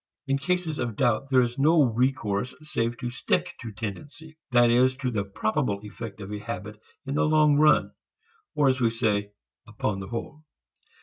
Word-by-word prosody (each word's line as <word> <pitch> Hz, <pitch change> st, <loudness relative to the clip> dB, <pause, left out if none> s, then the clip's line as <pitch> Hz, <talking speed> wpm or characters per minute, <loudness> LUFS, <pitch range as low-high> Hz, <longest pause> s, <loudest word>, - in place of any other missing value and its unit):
In 135 Hz, -1 st, 0 dB
cases 180 Hz, -1 st, -1 dB
of 115 Hz, -3 st, -2 dB
doubt, 120 Hz, +5 st, +1 dB
there 130 Hz, -2 st, +5 dB
is 120 Hz, +2 st, -4 dB
no 155 Hz, +2 st, +5 dB
recourse 120 Hz, -2 st, 0 dB
save 120 Hz, -5 st, -2 dB
to 120 Hz, -, -4 dB
stick 125 Hz, -, -1 dB
to 115 Hz, -3 st, -6 dB
"tendency," 145 Hz, +10 st, -8 dB
that 120 Hz, -2 st, +5 dB
is, 130 Hz, +2 st, +4 dB
to 130 Hz, -1 st, -3 dB
the 105 Hz, -3 st, -1 dB
probable 105 Hz, +3 st, -1 dB
effect 105 Hz, 0 st, -8 dB
of 100 Hz, 0 st, -7 dB
a 105 Hz, -, -4 dB
habit 105 Hz, -1 st, -7 dB, 0.2 s
in 135 Hz, -, -3 dB
the -, -, +2 dB
long 155 Hz, -1 st, +4 dB
run, 150 Hz, 0 st, +4 dB, 0.6 s
or 145 Hz, -, +3 dB
as 130 Hz, -1 st, +2 dB
we 115 Hz, -, +4 dB
say 105 Hz, -3 st, -1 dB, 0.3 s
upon 105 Hz, -2 st, -2 dB
the 100 Hz, -, -6 dB
whole. 120 Hz, +6 st, -6 dB
120 Hz, 180 wpm, -26 LUFS, 105-140 Hz, 0.6 s, there